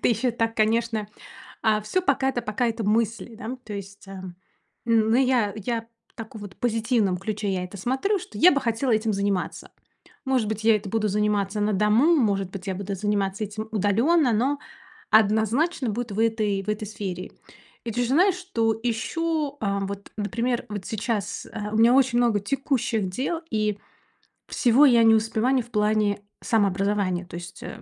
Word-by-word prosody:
это - - +2
ещё 240 +2 +1
так, 225 -1 -1
конечно. 220 -1 +1 0.5
А 215 -1 +3
всё 355 - -1
пока 270 -4 +1
это 245 -2 -1
пока 215 +3 -1
это 225 -1 -2
мысли, 225 +2 0
да, 245 +3 -6
то 215 - -8
есть, 200 0 -8
а, 190 -1 -8 0.6
ну, 225 -1 +3
я 250 -6 +2
я 225 +2 -3 0.3
так 225 -1 -9
вот 205 -3 -9
в - - -36
позитивном 225 -4 +1
ключе 210 +1 -3
я 180 -1 -2
это 180 +3 -9
смотрю, 265 - 0
что 215 - -10
я 360 +6 +7
бы 280 - +1
хотела 240 +1 -1
этим 215 0 +1
заниматься. 200 -2 -2 0.5
Может 260 -5 +1
быть, 220 0 -3
я 225 -1 +6
это 205 - -6
буду 215 +1 0
заниматься 210 0 0
на 210 0 +1
дому, 215 - +4
может 200 -7 +1
быть, 195 0 -8
я 190 - -2
буду 200 +1 -4
заниматься 200 +1 -1
этим 215 +2 -6
удалённо, 235 - +3
но 265 +6 +1 0.5
однозначно 220 - +2
будет 230 0 -4
в 205 - -5
этой 215 -3 +1
в 205 - -14
этой 210 0 -2
сфере. 190 -4 -6 0.5
И 230 - -3
ты 245 +2 0
же 240 - -1
знаешь, 365 +6 +4
что 230 - -1
ищу, 295 +5 -1
а, 200 -2 -1
вот, 200 0 -6
например, 235 +3 -2
вот 205 -3 -6
сейчас, 220 -2 -3
а, 210 -2 -5
у - - -1
меня 230 +2 +6
очень 260 -2 +3
много 235 -4 +3
текущих 240 -4 -1
дел, 275 - -2
и 210 -1 0 0.7
всего 255 +4 +4
я 235 -4 +6
не 225 0 +6
успеваю 225 +4 +1
в 240 - -20
плане 210 -1 +1 0.2
самообразования. 200 -3 +1
То 170 - -10
есть, 175 -1 -9
э, - - -8
220 Hz, 180 wpm, -25 LUFS, 205-240 Hz, 0.7 s, я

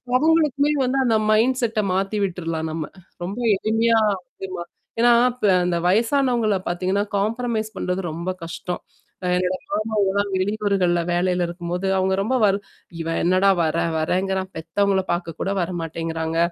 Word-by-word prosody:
அவுங்களுக்குமே 300 -1 +3
வந்து 255 +2 0
அந்த 225 -2 +3 0.2
மைண்ட்செட்டா 230 -1 +2
மாத்தி 195 +3 -1
விட்ற்றலாம் 165 -4 -2
நம்ம. 160 -1 -3 0.4
ரொம்ப 195 +6 -4 0.2
எளிமையா 225 +3 +2 0.5
ஆமா. 180 -2 -5 0.4
ஏன்னா 240 +1 +6 0.2
இப் 250 -4 -3 0.2
அந்த 175 -1 0
வயசானவங்களை 230 0 +2
பார்த்தீங்கனா, 185 +3 0
காம்ப்ரமைஸ் 220 +1 -1
பண்ணுறது 180 +1 -1
ரொம்பக் 180 +3 -4
கஷ்டம். 175 +1 -5 0.4
அ - - -1
என்னுடைய 185 0 -1
மாமா 215 +1 -1 0.2
எல்லாம் 200 0 0
வெளியூர்கள்ல 190 -3 +1
வேலையில 180 0 +1
இருக்கும்பொழுது 175 +2 -4
அவங்க 190 0 +1
ரொம்ப 255 +6 0
வைர் 200 -1 +4 0.4
இவ 165 - -4 0.2
என்னடா 185 +3 +4
வறேன் 160 +1 0
வறேகிறான்கிறான், 190 +3 0
பெத்தவங்களைப் 190 +4 0
பார்க்கக் 175 -2 -3
கூட 195 - -1
வர 170 - -2
மாட்டேன்கிறாங்க 165 0 -3
190 Hz, 140 wpm, -22 LUFS, 175-220 Hz, 0.5 s, ஏன்னா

